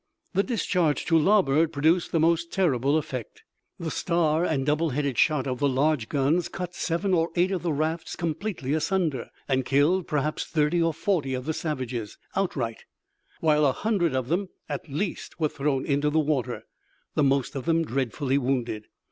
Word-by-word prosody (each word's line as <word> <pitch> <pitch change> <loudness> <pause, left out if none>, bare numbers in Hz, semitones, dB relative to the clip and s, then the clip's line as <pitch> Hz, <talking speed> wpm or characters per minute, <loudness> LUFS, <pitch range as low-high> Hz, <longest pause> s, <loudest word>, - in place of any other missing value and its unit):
The 195 - +3
discharge 180 - 0
to 165 - +2
larboard 165 -3 +4
produced 160 +4 +2
the 165 - +2
most 170 +1 +2
terrible 145 -6 +2
effect. 130 -7 -5 0.4
The 165 -1 -3
star 165 -2 +1
and 140 -6 0
double 150 +3 +1
headed 140 -1 -1
shot 150 -4 +3
of 130 -2 -2
the 140 - +2
large 135 -2 +1
guns 150 +5 +1
cut 180 -2 -5
seven 180 +3 -1
or 165 -1 +2
eight 180 +2 +2
of 185 -3 -1
the 170 - -1
rafts 160 +3 -2
completely 165 -3 -3
asunder, 160 - 0 0.2
and 130 -1 +1
killed, 145 +8 +2
perhaps, 150 +1 -1
thirty 155 +2 +1
or 165 0 +3
forty 150 -6 0
of 130 0 -5
the 160 - -1
savages 130 -9 -4 0.2
outright, 135 -12 -2 0.6
while 150 -1 +3
a 135 -3 +4
hundred 180 - 0
of 130 -2 -1
them, 180 +5 0 0.2
at 145 +1 -5
least, 170 +4 -4
were 155 -2 +2
thrown 140 -2 -1
into 145 +1 +1
the 155 - 0
water, 150 -5 0 0.5
the - - +1
most 135 0 +1
of 135 - -4
them 165 0 +2
dreadfully 135 +1 0
wounded. 120 -5 -2
155 Hz, 175 wpm, -26 LUFS, 135-170 Hz, 0.6 s, larboard